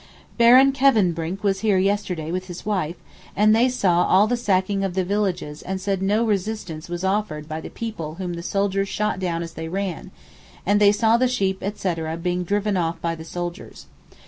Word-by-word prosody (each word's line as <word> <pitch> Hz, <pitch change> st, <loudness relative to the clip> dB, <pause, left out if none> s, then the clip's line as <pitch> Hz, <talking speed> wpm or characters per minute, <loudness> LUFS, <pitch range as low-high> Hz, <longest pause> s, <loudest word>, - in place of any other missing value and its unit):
Baron 255 Hz, +3 st, +7 dB
Kevenbrinck 195 Hz, -10 st, +1 dB
was 195 Hz, -1 st, +1 dB
here 210 Hz, -2 st, +2 dB
yesterday 185 Hz, -4 st, -1 dB
with 185 Hz, +1 st, -3 dB
his 175 Hz, 0 st, -8 dB
wife, 180 Hz, -6 st, -1 dB, 0.4 s
and 215 Hz, +2 st, +5 dB
they 240 Hz, +3 st, +4 dB
saw 180 Hz, -8 st, +2 dB
all 195 Hz, +3 st, +5 dB
the 245 Hz, +3 st, 0 dB
sacking 195 Hz, -3 st, 0 dB
of 190 Hz, -2 st, -2 dB
the 190 Hz, -, +1 dB
villages 185 Hz, -6 st, -2 dB
and 190 Hz, 0 st, -4 dB
said 195 Hz, 0 st, -2 dB
no 210 Hz, +4 st, +2 dB
resistance 195 Hz, -6 st, -3 dB
was 175 Hz, +1 st, -4 dB
offered 190 Hz, -6 st, -1 dB
by 155 Hz, 0 st, -5 dB
the -, -, -8 dB
people 185 Hz, -9 st, -6 dB
whom 180 Hz, -1 st, -4 dB
the 170 Hz, -, -5 dB
soldiers 195 Hz, +1 st, -1 dB
shot 210 Hz, -3 st, -1 dB
down 170 Hz, -2 st, -2 dB
as 165 Hz, -1 st, -8 dB
they 160 Hz, 0 st, -6 dB
ran, 185 Hz, 0 st, -4 dB, 0.6 s
and 205 Hz, +2 st, +3 dB
they 205 Hz, -1 st, +7 dB
saw 225 Hz, +2 st, +3 dB
the 255 Hz, +1 st, +3 dB
sheep 195 Hz, -6 st, 0 dB
etc. 170 Hz, -5 st, -3 dB
being 180 Hz, +1 st, -1 dB
driven 205 Hz, +2 st, 0 dB
off 165 Hz, -1 st, -1 dB
by 165 Hz, 0 st, -1 dB
the 160 Hz, -1 st, -8 dB
soldiers. 175 Hz, +1 st, -7 dB
190 Hz, 195 wpm, -23 LUFS, 170-210 Hz, 0.6 s, Baron